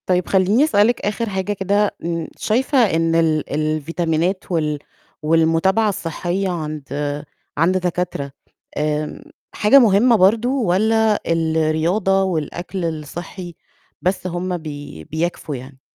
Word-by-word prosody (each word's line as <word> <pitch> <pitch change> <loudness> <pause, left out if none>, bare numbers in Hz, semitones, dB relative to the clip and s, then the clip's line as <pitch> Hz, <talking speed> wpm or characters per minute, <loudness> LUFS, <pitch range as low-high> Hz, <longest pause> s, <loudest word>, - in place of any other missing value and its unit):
طيب 180 -1 +1
خلّيني 195 +7 +3
أسألِك 240 -5 +3
آخر 215 +2 -2
حاجة 190 +1 -2
كده، 200 +1 0
م 170 -1 -2
شايفة 260 +6 0 0.2
إن 165 0 +1
ال 160 -2 +1
الفيتامينات 160 +4 -1
وال 150 -3 0 0.4
والمتابعة 165 +7 +3
الصحية 180 +1 -2
عند 150 -3 -4 0.3
عند 175 +5 +3
دكاترة 180 -6 -2 0.5
آمم، 150 0 -2 0.3
حاجة 220 +6 +6
مُهمة 230 +1 +5
برضه، 220 +5 +3
والّا 220 -2 +2
الرياضة 165 +4 +1
والأكل 175 +1 -3
الصحي 165 +3 -6 0.5
بس 185 0 -1
هم 180 +1 -2
بي 145 - -8
بيكفوا 160 - -3
يعني؟ 130 +1 -11
175 Hz, 115 wpm, -20 LUFS, 155-195 Hz, 0.5 s, حاجة